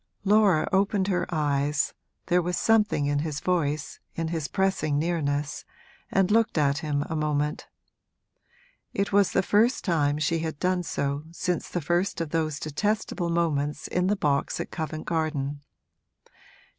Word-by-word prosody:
Laura 200 -5 +4
opened 195 0 +2
her 180 -2 0
eyes 145 -2 0 0.3
(there 180 0 +3
was 175 +1 -2
something 210 -9 +3
in 145 0 +1
his 150 -1 -3
voice, 155 -5 -1 0.2
in 165 -1 -2
his 160 -3 -2
pressing 190 -7 0
nearness), 145 -3 -1 0.5
and 195 0 +2
looked 225 -4 +3
at 145 -1 +2
him 150 -2 -1
a 160 - -3
moment: 150 -1 -1 1.3
it 200 0 -1
was 200 -1 +4
the 190 - +2
first 225 +6 +2
time 150 -6 +2
she 165 +2 0
had 160 -2 -3
done 185 0 +1
so 140 -3 -2
since 175 +1 -2
the 175 - -2
first 175 +5 0
of 165 -3 -3
those 155 -2 -1
detestable 180 +2 -1
moments 150 -3 0
in 180 0 0
the 205 - +2
box 145 -7 0
at - - -4
Covent 155 0 -4
Garden. 150 -4 -2
160 Hz, 150 wpm, -26 LUFS, 145-185 Hz, 1.3 s, Laura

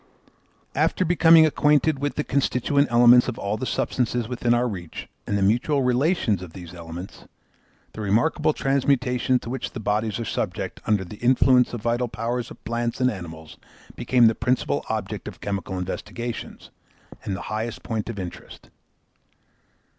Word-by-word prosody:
After 185 - +1
becoming 165 -1 +6
acquainted 150 -1 +2
with 145 +1 -2
the 150 - -1
constituent 140 +1 +1
elements 120 +1 +6
of 125 - -3
all 100 +1 -2
the 125 +4 -4
substances 120 0 -1
within 120 -1 -1
our 120 +1 +3
reach 90 -7 -7 0.2
and 100 - 0
the 100 - +1
mutual 125 +7 +2
relations 125 - +1
of 90 -3 -9
these 90 -2 -10
elements, 85 +2 -9 0.7
the 110 - -7
remarkable 150 +10 +2
transmutations 130 -3 +1
to 115 - -7
which 130 - -4
the - - -5
bodies 105 +1 -1
are 115 - -3
subject - - -3
under 105 -3 +1
the 95 +4 -10
influence 125 +1 +4
of 120 - -5
the 120 - -1
vital 120 +1 0
powers 115 +2 -3
of - - -13
plants 120 +1 -2
and 130 0 +3
animals, 80 -6 -9 0.4
became 125 -2 +3
the 110 - +5
principal 125 +4 0
object 105 -2 -4
of 100 -4 -8
chemical 100 -2 -4
investigations, 115 +6 -6 0.5
and 95 - -3
the - - -6
highest 110 +2 -4
point 110 -1 -3
of 115 - -5
interest. 90 -3 -9
120 Hz, 160 wpm, -24 LUFS, 105-130 Hz, 0.7 s, becoming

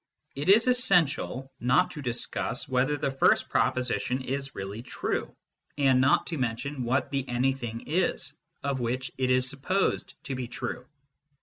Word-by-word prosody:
It 145 +6 -2
is 215 +4 +7
essential 175 - +2
not 130 +9 +3
to 150 - -7
discuss 120 -3 -2
whether 130 +3 +1
the 135 - -1
first 135 - +3
proposition 130 +1 0
is 135 +1 -4
really 100 +3 -5
true, 130 - -3 0.4
and 135 -3 +4
not 135 +2 +4
to 165 -4 -4
mention 125 +3 -2
what 130 +4 0
the 135 -1 0
anything 120 -2 -1
is, 175 +5 0 0.3
of 140 -1 -1
which 125 +2 -2
it 130 -1 +1
is 130 0 +3
supposed 150 +8 -1
to 135 - -4
be 130 -2 -3
true. 125 +1 -5
130 Hz, 150 wpm, -28 LUFS, 125-145 Hz, 0.4 s, is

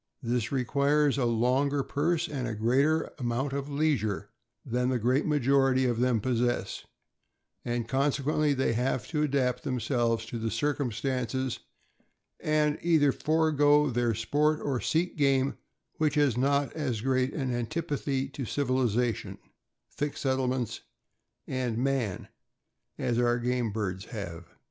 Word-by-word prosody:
This 120 -1 -1
requires 140 +2 +2
a 125 - +2
longer 130 +5 +1
purse 165 +5 0
and 125 -7 -4
greater 135 +8 +2
amount 130 +3 -1
of 140 +1 -3
leisure 120 -9 0 0.3
than 125 0 0
the 130 - +1
great 125 +6 +1
major 140 -2 +3
ity 130 0 +2
of 120 -2 0
them 125 -2 +2
possess, 120 +1 -1 0.8
and 120 -1 -2
consequently 140 +3 +1
they 130 -3 +1
have 125 -1 -1
to 155 -2 -1
adapt 130 -4 +1
themselves 120 -3 0
to 115 +1 -5
the 115 0 -1
circumstances, 130 0 -1 0.8
and 150 -1 +1
either 160 -4 +4
forego 150 -2 +3
their 120 -2 +1
sport 150 +7 +1
or 135 -4 -1
seek 170 +2 0
game 135 -2 +2 0.4
which 155 -1 +1
has 145 -5 +3
not 140 +2 +1
as 130 -9 -2
great 130 +1 0
an 130 -5 -1
antipathy 140 +1 -2
to 135 0 -6
civilization, 125 -3 0 0.5
thick 145 0 -3
settlements, 130 -4 -1 0.6
and 125 -3 -2
man, 125 -6 -1 0.7
as 120 -1 0
our 120 0 +3
game 120 -2 -1
birds 95 -3 -3
have. 85 -7 -7
130 Hz, 130 wpm, -28 LUFS, 120-145 Hz, 0.8 s, either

